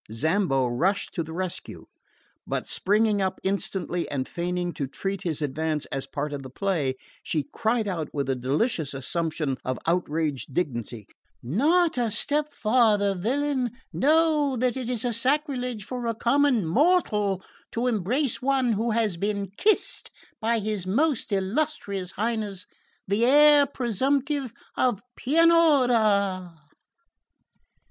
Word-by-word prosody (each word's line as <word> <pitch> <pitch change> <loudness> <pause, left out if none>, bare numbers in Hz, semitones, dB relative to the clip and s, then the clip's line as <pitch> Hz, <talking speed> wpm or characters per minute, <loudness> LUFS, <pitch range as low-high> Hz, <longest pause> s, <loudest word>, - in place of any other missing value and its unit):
Zambo 145 - +1
rushed 170 +12 0
to 170 - -2
the 160 0 -6
rescue; 185 +1 -5 0.6
but - - -2
springing 210 +1 +1
up 190 -1 -1
instantly, 190 -2 -2
and 135 -3 -2
feigning 175 0 -2
to 140 - -3
treat 195 +8 -4
his 160 -3 -2
advance 155 +1 -1
as 135 0 -3
a - - -37
part 145 +1 -3
of 140 - -4
the 130 - -9
play, 150 -4 -1 0.3
she 155 -3 -1
cried 220 -1 0
out 165 -6 -3
with 140 -2 -2
a 135 - +1
delicious 140 - -1
assumption 155 -1 -2
of 130 -1 -2
outraged 160 -5 -1
dignity: 120 - -3 0.4
"Not 300 - +2
a 235 -2 +1
step 295 +7 +1
farther, 215 -5 +3
villain! 255 +5 -1 0.2
Know 300 -2 +3
that 250 +1 +1
it 255 -2 -4
is 245 -3 0
sacrilege 250 -3 -1
for 245 0 -4
a 230 - -1
common 250 -2 +2
mortal 210 - +2 0.3
to 235 +2 -1
embrace 245 - 0
one 260 -2 +2
who 225 +3 -1
has 220 -5 0
been 200 0 -2
kissed 425 - +1 0.3
by 230 +1 +1
his 210 -3 -3
most 270 +4 +1
illustrious 200 - -1
Highness 210 -2 -3 0.4
the 200 +4 +1
Heir 290 +2 +6
presumptive 270 +2 0 0.2
of 245 -6 +1 0.2
Pianura!" 245 - +3
205 Hz, 135 wpm, -26 LUFS, 170-255 Hz, 0.6 s, Heir